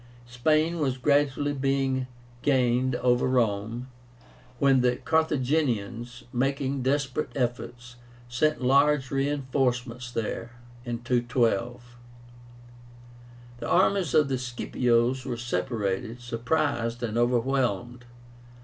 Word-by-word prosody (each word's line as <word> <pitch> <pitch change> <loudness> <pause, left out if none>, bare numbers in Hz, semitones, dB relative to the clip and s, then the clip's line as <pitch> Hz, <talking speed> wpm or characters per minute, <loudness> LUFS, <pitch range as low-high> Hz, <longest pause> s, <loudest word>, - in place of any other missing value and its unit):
Spain 155 +7 +1
was 135 -4 0
gradually 145 +1 +1
being 135 -1 0 0.3
gained 130 -2 +2
over 125 0 +2
to 130 - 0
Rome, 115 +1 0 0.7
when 135 0 +4
the 125 0 +2
Carthaginians, 130 -7 -1
making 135 +1 -1
desperate 135 +2 -1
efforts, 120 -1 -4 0.3
sent 125 +2 0
large 140 +1 +3
reinforcements 130 -3 -1
there 115 0 -4 0.3
(212). 120 0 -1 1.6
The - - -5
armies 185 -4 +2
of 150 -2 +5
the 130 -2 -1
Scipios 125 0 0
were 125 -2 -4
separated, 110 0 -2
surprised, 120 0 -1
and 110 -2 -2
overwhelmed. 120 -1 0
125 Hz, 95 wpm, -27 LUFS, 120-135 Hz, 1.6 s, of